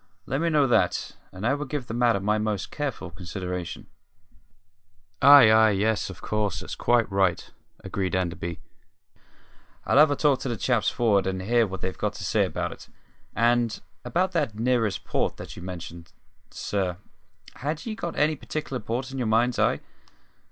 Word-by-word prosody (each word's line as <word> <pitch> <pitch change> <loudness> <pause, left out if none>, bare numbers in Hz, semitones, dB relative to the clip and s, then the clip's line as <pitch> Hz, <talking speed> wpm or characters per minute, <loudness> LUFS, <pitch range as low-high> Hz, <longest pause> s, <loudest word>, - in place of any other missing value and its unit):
Let 135 +4 -2
me 170 - +2
know 150 -3 +4
that, 120 - +1 0.2
and 95 +3 -7
I 125 - +3
will 145 0 -3
give 140 -2 -4
the 110 - -6
matter 120 -3 +2
my 105 +2 +1
most 105 -2 -2
careful 140 - -4
consideration." 90 +1 -6 1.4
"Ay, 140 -5 +9
ay, 110 0 +6
yes, 105 +1 0
of 90 -3 -11
course; 105 -5 -1
that's 95 - -7
quite 120 -2 +2
right," 95 -3 +1 0.4
agreed 95 -2 -2
Enderby. 85 -2 -3 1.3
"I'll 135 - +4
have 155 0 +7
a 145 - +1
talk 145 -3 +2
to 135 - -4
the 120 - -2
chaps 120 0 +1
for'ard, 105 -6 +2
and 95 -1 -2
hear 115 +2 +3
what 95 -1 -7
they've 95 - -3
got - - -1
to - - -8
say - - +2
about - - -3
it. - - -11 0.5
And 120 -1 +2 0.2
about 185 +2 0
that 150 - -1
`nearest 115 -3 0
port' - - -1
that - - -9
you - - -9
mentioned, 85 -2 -8 0.4
sir, 95 -4 -2 0.6
had 150 +3 -4
ye 225 - -3
got 175 -6 -5
any 155 +1 +3
particular 140 -2 -5
port 120 +4 -4
in 135 - -5
your 120 - -1
mind's 115 +3 +2
eye?" - - +2
110 Hz, 175 wpm, -26 LUFS, 95-135 Hz, 1.4 s, Ay